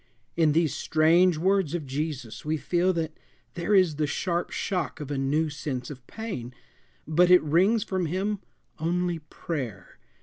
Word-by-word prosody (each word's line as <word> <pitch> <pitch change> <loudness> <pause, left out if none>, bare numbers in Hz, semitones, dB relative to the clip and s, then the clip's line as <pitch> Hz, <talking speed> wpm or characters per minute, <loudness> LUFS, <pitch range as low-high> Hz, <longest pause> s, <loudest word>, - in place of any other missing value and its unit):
In 160 -3 +3
these 160 -3 +2
strange 160 +3 +3
words 185 -1 +1
of 160 -4 -3
Jesus 135 -5 -4
we 155 +1 -1
feel 175 +4 +1
that 160 -2 -3 0.4
there 175 +4 +1
is 180 -6 +4
the 155 -1 +1
sharp 175 +3 -1
shock 180 -4 -2
of 145 -1 -6
a 140 - -1
new 145 +4 +1
sense 140 -3 -4
of 130 -3 -11
pain, 160 - -6 0.5
but 175 +3 +4
it 180 -2 +7
wrings 190 +9 +3
from 185 -3 -1
him 195 +5 -1 0.4
only 175 +1 0
prayer. 150 - -6
160 Hz, 160 wpm, -27 LUFS, 150-180 Hz, 0.5 s, it